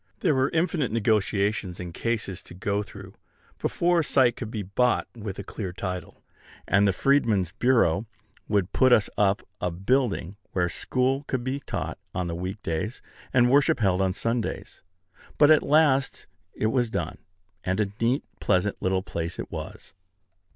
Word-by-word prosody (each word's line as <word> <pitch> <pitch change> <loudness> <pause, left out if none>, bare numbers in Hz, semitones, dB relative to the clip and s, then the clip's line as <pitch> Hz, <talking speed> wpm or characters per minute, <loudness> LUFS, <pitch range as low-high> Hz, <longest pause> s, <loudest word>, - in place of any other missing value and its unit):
There 165 -6 +3
were 130 0 +2
infinite 160 -6 0
negotiations 105 -3 0
and 90 -2 -6
cases 110 -4 -2
to 85 - -12
go 100 +2 -1
through 105 - -10 0.5
before 175 0 +2
a - - +2
site 130 -4 +3
could 115 - -6
be 110 -2 -4
bought 120 +6 +1
with 105 -4 -6
a 100 - -5
clear 95 -1 -5
title; 90 -1 -6 0.4
and 100 0 +4
the - - +4
Freedman's 105 - +2
Bureau 115 -4 +2 0.4
would 100 -3 0
put 130 -1 +4
us 110 -3 +4
up 100 -1 +2 0.2
a 90 - +1
building 100 0 0 0.2
where 90 -2 +1
school 130 +8 0
could 130 -2 -2
be 130 +2 -2
taught - - -4 0.2
on 85 -2 -2
week 95 +3 -5
days, 85 +9 -2 0.3
and 125 -1 +4
worship 140 -2 +4
held 95 -3 +2
on 95 -1 +2
Sundays: 115 +4 -3 0.6
but 150 +1 +6
at 155 - +6
last 140 -2 +3 0.3
it 110 - 0
was 120 -3 +2
done; - - -3 0.4
and 95 +2 -1
a 100 -2 0
neat, 120 +4 +2 0.2
pleasant 100 +1 +1
little 95 0 +1
place 85 -3 -4
it - - -6
was. - - -8
105 Hz, 165 wpm, -26 LUFS, 95-130 Hz, 0.6 s, but